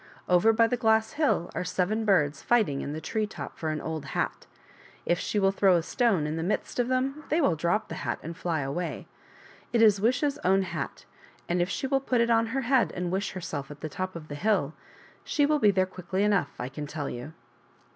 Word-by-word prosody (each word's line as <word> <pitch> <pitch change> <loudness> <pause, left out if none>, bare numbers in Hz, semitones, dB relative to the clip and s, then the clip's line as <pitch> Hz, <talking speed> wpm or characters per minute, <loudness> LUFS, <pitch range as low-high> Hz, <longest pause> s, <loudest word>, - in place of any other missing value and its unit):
Over 180 +5 +5
by 230 +1 +4
the 245 +2 0
glass 220 -1 +2
hill 285 - 0
are - - -2
seven 190 +5 -1
birds 150 -8 +2
fighting 210 -13 +2
in 140 - -4
the 155 - -4
tree 215 +7 -2
top - - -8
for 160 - -3
an 155 0 -2
old 160 -1 -4
hat. - - -2 0.6
If 175 - +1
she 210 - -2
will 195 -1 +4
throw 195 -1 +4
a 170 - +1
stone 200 - +1
in 155 +1 -2
the - - -2
midst 210 +6 -2
of 245 - +2
them 265 +4 -1
they 315 - +2
will 230 - +3
drop 170 +7 0
the - - -7
hat - - -2
and 165 +2 -6
fly 165 -3 -1
away. 145 +6 -3 0.7
It 235 - +2
is 210 -3 +5
Wish's 255 +6 +1
own 190 +1 +3
hat, 185 - -5 0.4
and 175 0 +1
if 175 - 0
she 230 - -2
will 270 0 +1
put 255 -2 0
it 235 0 +3
on 230 0 +3
her 265 +4 -1
head 245 - +2
and 180 -1 -2
wish 195 +2 -1
herself 150 -6 -5
at 145 -1 -11
the 155 - -4
top 185 +4 -4
of 160 -2 -8
the 145 - -7
hill, 170 -3 +1 0.5
she 290 - +2
will 300 +1 +2
be 210 - +5
there 190 -1 +3
quickly 185 +1 -3
Enough, 200 -8 +2
I 125 - -3
can 145 +2 -6
tell 145 -1 -4
you." 125 +6 -6
190 Hz, 230 wpm, -28 LUFS, 160-225 Hz, 0.7 s, Over